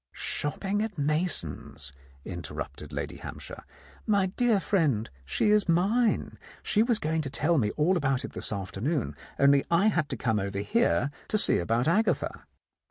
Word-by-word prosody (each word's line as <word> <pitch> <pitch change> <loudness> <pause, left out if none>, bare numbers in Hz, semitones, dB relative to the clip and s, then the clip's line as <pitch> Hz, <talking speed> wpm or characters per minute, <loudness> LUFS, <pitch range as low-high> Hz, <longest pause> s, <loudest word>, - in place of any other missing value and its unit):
"Shopping 195 +7 -2
at 220 -4 -3
Mason's," 145 - -2 0.3
interrupted - - -6
Lady - - -4
Hampshire. - - -8 0.4
"My 200 -3 +3
dear 220 +3 +2
friend, 150 - +1 0.2
she 210 - +1
is 210 -3 +3
mine. 210 +8 +2 0.2
She 210 - +3
was 235 0 +3
going 160 -1 -1
to 140 - -4
tell 155 +4 +2
me 105 -4 +1
all 165 +5 +3
about 135 -6 +1
it - - -9
this - - -3
afternoon, 105 - -2 0.2
only 140 0 +5
I 175 +6 +4
had 170 -7 0
to - - -3
come 110 -4 0
over 100 0 -3
here 145 - +1 0.2
to 215 - +1
see - - +4
about 115 - 0
Agatha." 210 +7 0
160 Hz, 160 wpm, -28 LUFS, 130-205 Hz, 0.4 s, only